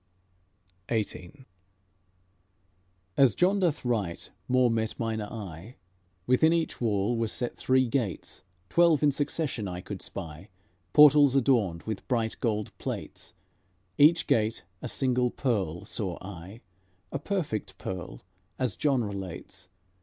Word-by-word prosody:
XVIII 110 Hz, +3 st, -3 dB, 1.7 s
As 135 Hz, -6 st, +5 dB
John 190 Hz, +3 st, +3 dB
doth 165 Hz, -8 st, 0 dB
write 105 Hz, -8 st, -2 dB, 0.2 s
more 125 Hz, -1 st, +3 dB
met 110 Hz, -1 st, -1 dB
mine 110 Hz, -1 st, -1 dB
eye: 105 Hz, -1 st, -8 dB, 0.5 s
Within 130 Hz, +6 st, +4 dB
each 165 Hz, -5 st, -1 dB
wall 105 Hz, 0 st, +1 dB
were 115 Hz, -1 st, 0 dB
set 120 Hz, +2 st, -3 dB
three 130 Hz, 0 st, +2 dB
gates; 115 Hz, -, -2 dB, 0.3 s
Twelve 170 Hz, -, +4 dB
in 145 Hz, -, +5 dB
succession 140 Hz, -5 st, -2 dB
I 90 Hz, -1 st, -5 dB
could 95 Hz, +1 st, -7 dB
spy, 85 Hz, 0 st, -7 dB, 0.4 s
Portals 145 Hz, 0 st, +7 dB
adorned 115 Hz, -11 st, +2 dB
with 110 Hz, -3 st, -5 dB
bright 115 Hz, -4 st, 0 dB
gold 105 Hz, -3 st, -2 dB
plates; -, -, -6 dB, 0.6 s
Each 160 Hz, +3 st, +6 dB
gate 110 Hz, 0 st, +1 dB, 0.2 s
a -, -, -4 dB
single 125 Hz, -2 st, +1 dB
pearl 100 Hz, -, -2 dB
saw 95 Hz, -6 st, -3 dB
I, 95 Hz, +4 st, -10 dB, 0.5 s
A 140 Hz, -, -2 dB
perfect 150 Hz, -, -3 dB
pearl, 90 Hz, -10 st, -6 dB, 0.4 s
as 125 Hz, -7 st, 0 dB
John 135 Hz, -5 st, +1 dB
relates. 95 Hz, -4 st, -7 dB
115 Hz, 125 wpm, -28 LUFS, 100-135 Hz, 1.7 s, Portals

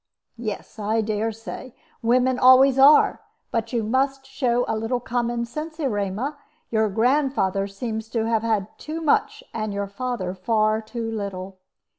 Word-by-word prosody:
"Yes, 215 Hz, -1 st, -6 dB
I 215 Hz, +2 st, +1 dB
dare 215 Hz, +1 st, -1 dB
say. 225 Hz, +3 st, -9 dB, 0.3 s
Women 250 Hz, +2 st, +2 dB
always 260 Hz, +1 st, +7 dB
are. 285 Hz, +3 st, +6 dB, 0.3 s
But 230 Hz, -1 st, -2 dB
you 235 Hz, -2 st, 0 dB
must 270 Hz, +4 st, 0 dB
show 250 Hz, -3 st, 0 dB
a -, -, 0 dB
little 225 Hz, +3 st, -1 dB
common 240 Hz, 0 st, -1 dB
sense, 310 Hz, +6 st, -7 dB
Erema. 240 Hz, +2 st, -2 dB, 0.3 s
Your 220 Hz, -1 st, +2 dB
grandfather 225 Hz, -4 st, +1 dB
seems 220 Hz, +2 st, -5 dB
to 225 Hz, -2 st, -1 dB
have 225 Hz, -1 st, +1 dB
had 220 Hz, -4 st, 0 dB
too 315 Hz, +2 st, -5 dB
much, 430 Hz, -, +1 dB
and 215 Hz, -2 st, -3 dB
your 200 Hz, 0 st, -1 dB
father 200 Hz, -3 st, -4 dB
far 215 Hz, +3 st, +1 dB
too 225 Hz, +1 st, -5 dB
little. 195 Hz, -3 st, -5 dB
230 Hz, 150 wpm, -23 LUFS, 215-255 Hz, 0.3 s, always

